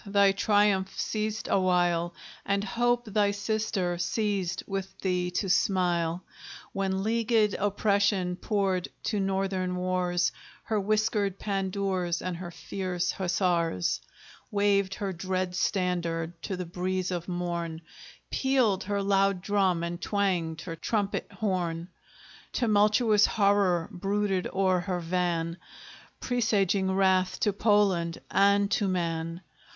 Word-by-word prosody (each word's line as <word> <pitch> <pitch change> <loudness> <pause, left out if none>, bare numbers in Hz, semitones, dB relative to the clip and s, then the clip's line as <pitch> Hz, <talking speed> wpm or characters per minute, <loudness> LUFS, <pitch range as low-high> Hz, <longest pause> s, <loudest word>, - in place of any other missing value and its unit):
thy 200 -1 +4
triumph 205 -1 +2
ceased 215 0 -2
a - - +3
while, 175 -2 +2 0.3
And 200 0 0
Hope, 240 +3 +1
thy 210 -1 +2
sister, 200 -4 -1
ceased 195 -1 -1
with 195 -1 -5
thee 180 -2 0
to 195 - 0
smile, 180 -2 +1 0.5
When 195 0 -1
leagued 225 -1 +2
Oppression 200 -2 +1
poured 195 -2 0 0.2
to 210 - -1
Northern 190 -1 -1
wars 180 -1 0 0.3
Her 220 -1 0
whiskered 210 -1 0
pandoors 190 -3 -1
and 185 -2 -4
her 175 0 -6
fierce 180 0 -3
hussars, 175 - 0 0.5
Waved 200 -2 +2
her 195 -2 -3
dread 185 +1 -2
standard 175 -4 -1
to 190 - -4
the 180 - -4
breeze 185 +2 -2
of 175 -1 -3
morn, 170 -2 -3 0.5
Pealed 255 -8 +2
her 200 0 -1
loud 195 -2 +2
drum, 190 -5 +1
and 170 0 -4
twanged 180 -6 0
her 165 -2 -6
trumpet 205 +3 -1
horn; 175 -4 -2 0.6
Tumultuous 215 -1 +4
horror 200 -5 +2
brooded 195 0 -1
o'er 190 -1 +2
her 180 0 -2
van, 170 -1 -1 0.6
Presaging 200 -6 +1
wrath 190 -1 +2
to 210 - +2
Poland 195 -5 +2
and 200 +1 +4
to 205 - +1
man! 165 -2 -2
190 Hz, 120 wpm, -28 LUFS, 180-205 Hz, 0.6 s, thy